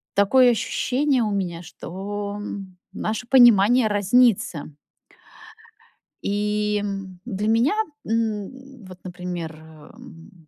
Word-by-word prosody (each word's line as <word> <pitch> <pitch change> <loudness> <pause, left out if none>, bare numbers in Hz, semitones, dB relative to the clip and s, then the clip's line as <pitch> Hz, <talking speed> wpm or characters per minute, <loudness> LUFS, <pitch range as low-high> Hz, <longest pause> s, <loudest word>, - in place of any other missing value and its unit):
такое 245 +5 +5
ощущение 260 +2 0
у 210 - -1
меня, 180 -4 -3
что 200 +4 -6 0.5
наше 220 +3 -4
понимание 240 -2 +6
разнится. 205 -6 +2 1.5
И 210 0 -1 0.4
для 210 -3 -3
меня, 230 - +3 0.3
м, 230 +3 -3
вот, 185 -1 -12
например, 180 -3 -6
м, 160 +2 -15
205 Hz, 85 wpm, -23 LUFS, 185-240 Hz, 1.5 s, понимание